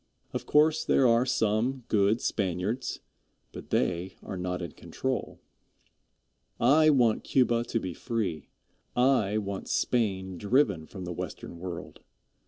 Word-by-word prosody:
Of - - -4
course 155 +1 +4
there 130 - +4
are 120 +2 +3
some 120 +2 +1
good 105 +2 +2
Spaniards, 100 +5 -2 0.5
but - - -10
they 90 +1 0
are 95 - -6
not 90 0 -3
in 85 - -5
control. - - -4 1.2
I 150 +6 +5
want 120 -7 +3
Cuba 120 -3 +2
to 115 - -1
be 95 -4 -5
free. 95 - -3 0.5
I 125 -5 +3
want 100 -2 -4
Spain 95 -6 0
driven 100 - +2
from 95 -3 -8
the 90 - -4
Western 85 0 -7
World. 90 -1 -7
105 Hz, 130 wpm, -28 LUFS, 95-125 Hz, 1.2 s, I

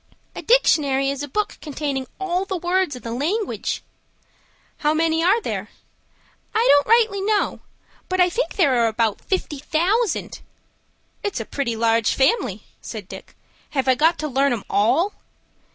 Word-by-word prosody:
"A - - -5
dictionary 280 - +3
is 280 0 -5
a 290 - -4
book 420 +9 -2
containing 280 -3 -3
all 370 -1 -1
the 390 -1 -3
words 355 -3 0
in 250 - -11
the 230 - -5
language." 340 - -2 0.9
"How 300 +1 +1
many 325 0 +1
are 390 +6 +4
there?" - - -4 0.9
"I 455 +3 +3
don't 285 0 +4
rightly 445 -4 +4
know; 415 +1 0 0.5
but 370 0 -1
I 360 - +6
think 465 +8 -2
there 265 - +3
are - - +4
about 220 -1 0
fifty 340 -6 -2
thousand." 360 - 0 0.8
"It's 405 -10 -3
a 225 - -4
pretty 240 -3 -2
large 225 0 +2
family," 265 - +1 0.2
said 215 -5 -7
Dick. - - -11 0.4
"Have 265 - +1
I 260 - +6
got 320 +6 +3
to 310 - -3
learn 275 -1 +2
'em 225 - -4
all?" 320 - +2
310 Hz, 160 wpm, -22 LUFS, 260-385 Hz, 0.9 s, I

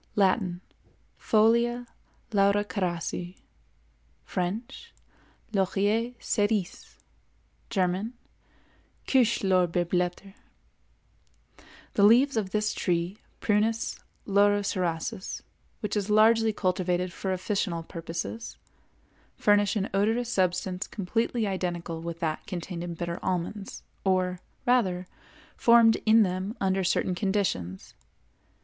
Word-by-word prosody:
Latin—Folia 215 +4 0 0.5
Laurocerasi; 195 -3 0 0.9
French—Laurier 210 - -3
cérise; 205 -4 -1 0.7
German—Kirschlorbeerblätter. 185 -2 -1 1.6
The - - +1
leaves 245 +6 +6
of 210 -4 0
this 210 +2 0
tree 175 +2 -1 0.2
(Prunus 220 +2 +1 0.3
Laurocerasus), 195 -4 0 0.4
which 210 -1 -2
is 205 0 -1
largely 220 +1 +5
cultivated 180 -2 -1
for 190 - -3
officinal 185 -2 -1
purposes, 165 +7 -6 0.8
furnish 205 0 +3
an 205 -2 0
odorous 225 +4 +1
substance 185 0 0
completely 225 +3 -1
identical 175 -4 -3
with 170 0 -6
that 160 -2 -2
contained 175 -1 -5
in 175 -1 -5
bitter 170 0 -4
almonds, 185 +2 -3 0.2
or, 185 -1 +1 0.3
rather, 190 -8 +2 0.5
formed 235 -1 +6
in 220 +1 +7
them 185 +4 -3
under 190 0 +1
certain 180 +1 +1
conditions. 180 - -2
195 Hz, 80 wpm, -27 LUFS, 180-215 Hz, 1.6 s, in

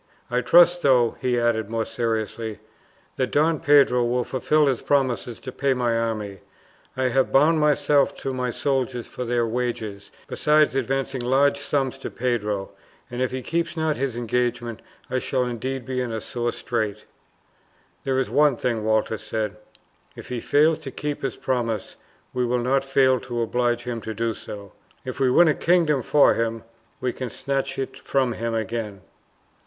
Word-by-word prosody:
I 125 +1 +2
trust, 175 +6 +6
though," 125 -5 +3
he 125 -1 +1
added 110 -3 0
more 115 -1 -1
seriously, 110 -1 -3 0.6
"that 130 -1 0
Don 155 +1 +2
Pedro 140 -4 +4
will 120 +1 +1
fulfil 150 +5 +1
his 130 -4 0
promises 125 -5 0
to 130 - -6
pay 135 +1 0
my 120 -2 +1
army. 110 -4 -2 0.6
I 130 -1 +1
have 130 +2 +1
bound 155 +4 +4
myself 145 -1 +3
to 135 - -3
my 125 -1 -2
soldiers 130 -2 -1
for 125 - -6
their 120 0 +1
wages, 115 -4 -3 0.2
besides 150 -1 +3
advancing 135 0 -1
large 140 +3 +2
sums 135 -2 -1
to - - -5
Pedro, 105 -5 -2 0.4
and 125 +1 -4
if 130 - +1
he 130 0 -5
keeps 170 +3 -2
not 160 -1 +1
his 135 -4 -2
engagements 120 -1 -2 0.3
I 130 +1 -1
shall 130 0 0
indeed 125 +2 -4
be 130 -1 -2
in 125 -2 -3
a 110 - -2
sore 120 +2 -2
strait." 110 -4 -3 1.0
"There 135 -1 0
is 130 - +1
one 145 -2 +3
thing," 115 -3 -1
Walter 110 0 +1
said; 110 -2 -3 0.6
"if - - -11
he 125 -1 -3
fail 155 +6 +3
to 155 -4 -8
keep 145 +2 -4
his 135 - -2
promises, 115 -5 -2 0.4
we 125 - 0
will 125 +1 +1
not 130 +3 +1
fail 135 -1 +3
to 120 -2 -4
oblige 120 +1 0
him 120 -2 -4
to 110 +1 -6
do 115 +1 -1
so. 100 -1 -9 0.3
If 130 +1 -5
we 130 -2 +3
win 170 +7 +6
a 155 - +4
kingdom 165 -5 +2
for 145 +3 +4
him, 115 0 -2 0.4
we 125 -1 -1
can 130 -2 -5
snatch 135 +2 -3
it 130 0 -4
from 130 -3 0
him 115 +1 -3
again." 110 -2 -3
125 Hz, 175 wpm, -24 LUFS, 115-135 Hz, 1.0 s, trust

